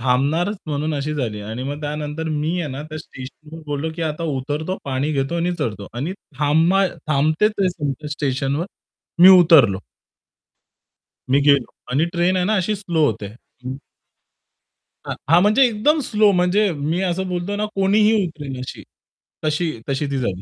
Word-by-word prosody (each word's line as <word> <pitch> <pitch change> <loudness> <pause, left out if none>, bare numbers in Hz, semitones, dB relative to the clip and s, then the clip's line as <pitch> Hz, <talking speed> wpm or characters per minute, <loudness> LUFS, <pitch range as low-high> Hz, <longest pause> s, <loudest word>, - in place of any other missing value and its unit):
थांबणारच 145 - +1
म्हणून 155 +1 -2
अशी 145 +1 -2
झाली 115 -7 -3
आणि 110 +4 -6
मग 145 +3 -4
त्यानंतर 150 +1 -4
मी 155 +1 -1
आहे 155 -4 -4
ना, 135 +2 -5
त्या 155 +1 -7
स्टेशनवर 150 +3 -11
बोललो 145 +2 -2
की, 170 - -3
"आता 155 +1 -3 0.2
उतरतो, 150 +7 -3
पाणी 140 +2 -1
घेतो 135 +3 -1
आणि 175 +1 0
चढतो." 105 -3 -3
आणि 135 +10 -3 0.3
थांबाय 165 +6 +3 0.2
थांबतेच 155 +8 +2
आहे 190 - +3
तुमच्या 145 0 -3
स्टेशनवर 140 +2 -1 0.6
मी 185 - +11
उतरलो. 140 - +6 1.5
मी 135 +2 +4
गेलो 140 -3 +3 0.2
आणि 145 +5 +2
ट्रेन 175 +2 +2
आहे 180 - +1
ना, 215 +3 +2
अशी 205 +2 0
स्लो 175 -6 0
होते. 110 -5 -2 0.4
हं. 130 +1 -4 1.3
हां. - - -3
हां, 170 +2 +6
म्हणजे 215 +7 +5
एकदम 245 +8 +2
स्लो 210 -1 +4
म्हणजे 185 +2 +2
मी 155 +4 -2
असं 185 +1 -1
बोलतो 180 +3 -2
ना, 210 +1 -1
कोणीही 205 +3 +3
उतरेल 145 -6 -7
अशी. 125 - -7 0.6
तशी 155 +2 0 0.2
तशी 140 +2 -1
ती 140 - -1
झाली. 95 -7 -2
155 Hz, 160 wpm, -21 LUFS, 140-180 Hz, 1.5 s, मी